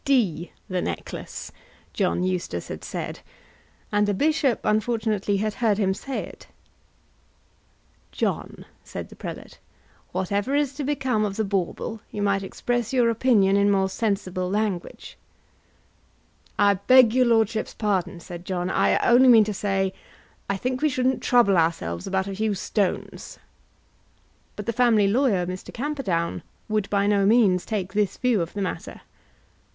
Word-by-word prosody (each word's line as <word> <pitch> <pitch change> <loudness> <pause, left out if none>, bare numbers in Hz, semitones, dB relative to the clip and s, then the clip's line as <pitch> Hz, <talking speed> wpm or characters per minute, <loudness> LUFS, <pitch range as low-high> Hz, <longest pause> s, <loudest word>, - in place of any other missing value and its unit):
"D 195 - +1 0.2
the 185 -1 -2
necklace!" - - -6 0.4
John 185 -2 0
Eustace 180 - -3
had - - -7
said, - - -5 0.7
and 205 0 +2
the 205 - 0
bishop 290 0 +1
unfortunately 215 -2 0
had 215 +1 -1
heard 210 -1 +1
him 195 -3 +1
say 270 +7 -4
it! - - -14 1.6
"John," - - -3 0.2
said - - -7
the - - -13
prelate, - - -8 0.5
"whatever 200 +8 -1
is 285 -2 +1
to 290 +1 -5
become 265 -6 0
of 200 -2 -2
the 220 - 0
bauble, 200 +2 -3
you 205 - -4
might 200 -1 +1
express 240 +4 -2
your 245 -3 +3
opinion 220 -5 +3
in 200 0 +3
more 195 -1 +2
sensible 190 -3 -2
language." 205 -3 -3 1.4
"I 205 0 +5
beg 255 -3 +7
your 255 -1 +4
lordship's 225 -1 +1
pardon," 190 -4 -1
said 175 0 -9
John, 180 -1 -2
"I - - +3
only 250 +2 +6
mean 230 -3 +8
to 210 0 -3
say 195 -1 -1 0.5
that 200 - 0
I - - -4
think 255 +5 -2
we 305 - +3
shouldn't 255 -1 0
trouble 235 -6 +4
ourselves 90 - -1
about 190 0 0
a 195 - -4
few 215 0 0
stones." 195 0 -3 1.2
But 210 - -6
the 230 - -1
family 225 -4 +4
lawyer, 210 -5 +2
Mr. 180 +1 -6
Camperdown, 240 - -2 0.3
would 215 -2 -1
by 200 -1 +1
no 200 -1 +3
means 205 -5 +3
take 195 -4 -3
this 205 -2 0
view 245 -6 +2
of 170 - -4
the 205 - -2
matter. 185 - -5
205 Hz, 150 wpm, -24 LUFS, 190-235 Hz, 1.6 s, mean